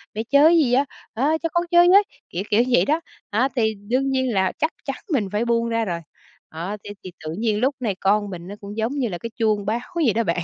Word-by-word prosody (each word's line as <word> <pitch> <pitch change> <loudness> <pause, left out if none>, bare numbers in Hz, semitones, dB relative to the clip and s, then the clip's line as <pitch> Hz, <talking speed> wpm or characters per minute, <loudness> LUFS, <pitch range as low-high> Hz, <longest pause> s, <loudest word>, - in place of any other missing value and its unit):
Mẹ 220 - -2
chơi 280 +1 +6
cái 340 - +5
gì 270 -7 +3
á? 270 +3 +4 0.3
A, 285 +7 +1
cho 330 - 0
con 345 - +2
chơi 345 0 +6
với", 400 +3 +7 0.3
kiểu 180 - -3
kiểu 220 +3 +4
vậy 245 - +4
đó. 310 +3 +1 0.3
À, 240 +6 +1
thì 220 -3 +1
đương 260 +4 +1
nhiên 260 -2 0
là 190 -2 +2
chắc 315 +2 +1
chắn - - -2 0.2
mình 215 -8 +1
phải 210 +3 0
buông 235 0 +1
ra 230 0 0
rồi. 170 -4 -2 0.5
Đó, 175 +6 -5
thế 205 - -8
thì 185 - -8
tự 155 - -3
nhiên 220 -2 +1
lúc 265 +4 +1
này 220 -6 -1
con 205 +1 +2
mình 175 -2 -8
nó 200 - -7
cũng 205 +1 -8
giống 225 +4 -1
như 275 -4 0
là 175 - -4
cái 230 - -6
chuông 215 -4 +1
báo 220 +3 0 0.2
vậy 300 -10 +2
đó 230 - +1
bạn. 175 -3 -1
230 Hz, 265 wpm, -22 LUFS, 205-270 Hz, 0.5 s, với